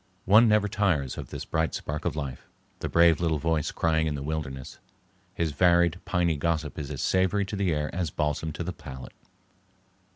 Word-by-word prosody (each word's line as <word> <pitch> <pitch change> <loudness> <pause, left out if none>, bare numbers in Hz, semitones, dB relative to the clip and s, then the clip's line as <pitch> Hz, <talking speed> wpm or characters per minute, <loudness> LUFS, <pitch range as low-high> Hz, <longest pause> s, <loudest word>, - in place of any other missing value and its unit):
One 110 +5 +7
never 105 -1 +3
tires 90 -11 0
of - - -7
this - - -6
bright 80 0 -1
spark 75 +1 -4
of - - -1
life, 70 -4 -5 0.3
the - - -3
brave 85 -1 +5
little 80 -2 +1
voice 80 0 0
crying 80 -1 +1
in 75 - -1
the 70 - -5
wilderness. 70 -4 -5 0.6
His 85 -2 0
varied, 85 +2 +3
piney 85 -4 +1
gossip 80 -1 -1
is 70 -3 -5
as - - -4
savory 95 +2 +2
to 100 - -5
the 95 -3 +1
air 75 -1 -2
as 90 -3 -1
balsam 75 +1 -2
to 85 - -4
the 90 +1 -4
palate. 65 -5 -10
80 Hz, 190 wpm, -27 LUFS, 75-90 Hz, 0.6 s, One